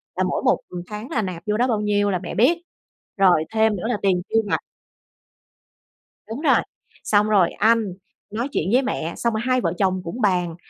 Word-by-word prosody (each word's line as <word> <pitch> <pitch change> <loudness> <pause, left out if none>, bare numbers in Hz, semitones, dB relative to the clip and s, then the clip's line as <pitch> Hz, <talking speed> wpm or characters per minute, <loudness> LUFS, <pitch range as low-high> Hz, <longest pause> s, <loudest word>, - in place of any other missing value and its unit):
là 185 - 0
mỗi 185 - -1
một, - - +3
ừm, 175 -1 -6
tháng 215 +4 -7
là 235 -9 0
nạp 180 -4 -5
vô 210 0 +1
đó 250 +2 +2
bao 215 -3 0
nhiêu 205 -1 +1
là 180 - 0
mẹ - - -6
biết, 270 - +4 0.6
rồi 180 -5 +4
thêm 220 -1 +3
nữa 180 - -6
là 245 - 0
tiền 185 -2 +2
tiêu 225 - +3
vặt - - +1 1.7
Đúng 235 +7 -5
rồi. - - +4 0.4
Xong 210 0 +2
rồi 195 -5 +4
anh 220 -3 +2 0.4
nói 230 +4 -2
chuyện 180 - -1
với 260 - +5
mẹ. 170 -10 -3
Xong 235 -1 0
rồi 220 - -1
hai 255 0 +2
vợ - - 0
chồng 185 -2 +1
cũng 225 +9 -6
bàn 180 -5 +1
210 Hz, 210 wpm, -22 LUFS, 185-230 Hz, 1.7 s, với